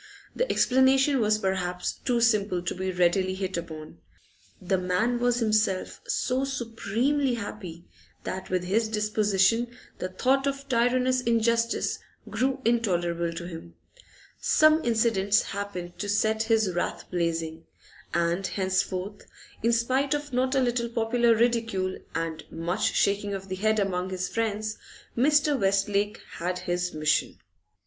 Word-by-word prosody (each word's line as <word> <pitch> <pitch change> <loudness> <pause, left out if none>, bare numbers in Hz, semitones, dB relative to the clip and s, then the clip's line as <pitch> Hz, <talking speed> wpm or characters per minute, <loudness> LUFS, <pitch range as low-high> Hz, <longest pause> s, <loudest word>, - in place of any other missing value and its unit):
The - - 0
explanation 265 +2 +4
was 215 -1 +3
perhaps 180 -3 -2
too 245 -3 -1
simple 205 -6 +2
to 180 - -2
be 190 0 -3
readily 185 +1 +2
hit 190 -1 -3
upon; 160 - -7 0.6
the 190 0 0
man 185 +7 0
was 245 0 +2
himself 215 -4 0
so 255 +1 0
supremely 250 +1 -1
happy 185 -6 -7 0.4
that 190 0 -5
with 185 -1 0
his 215 +5 +1
disposition 210 +1 +2 0.3
the 185 - -3
thought 265 +8 +1
of 275 0 -3
tyrannous 255 +1 +2
injustice 230 0 +1 0.3
grew 265 +1 -1
intolerable 175 -7 +1
to 170 +1 -6
him. 165 - -9 0.6
Some 310 +1 +4
incidents 220 -3 +2
happened 185 -3 -6
to 205 - -3
set 220 +2 +1
his 220 -3 +2
wrath 175 - -2
blazing, 165 -2 -2 0.5
and 170 +2 0
henceforth, 190 +1 -2 0.3
in 230 - +2
spite 260 +5 +1
of 290 -2 -6
not 255 +2 +1
a 265 - +3
little 240 -1 0
popular 230 0 +2
ridicule 225 -5 0 0.2
and 165 -1 -3
much 170 +3 -1
shaking 200 0 +1
of 195 0 -8
the 185 - -2
head 215 +3 +1
among 190 -2 -1
his 185 -1 -3
friends, 215 -1 -2 0.4
Mr. 290 +2 +3
Westlake 200 +1 +1 0.2
had 180 +1 -1
his 180 0 -2
mission. 155 -1 0
210 Hz, 135 wpm, -27 LUFS, 185-240 Hz, 0.6 s, explanation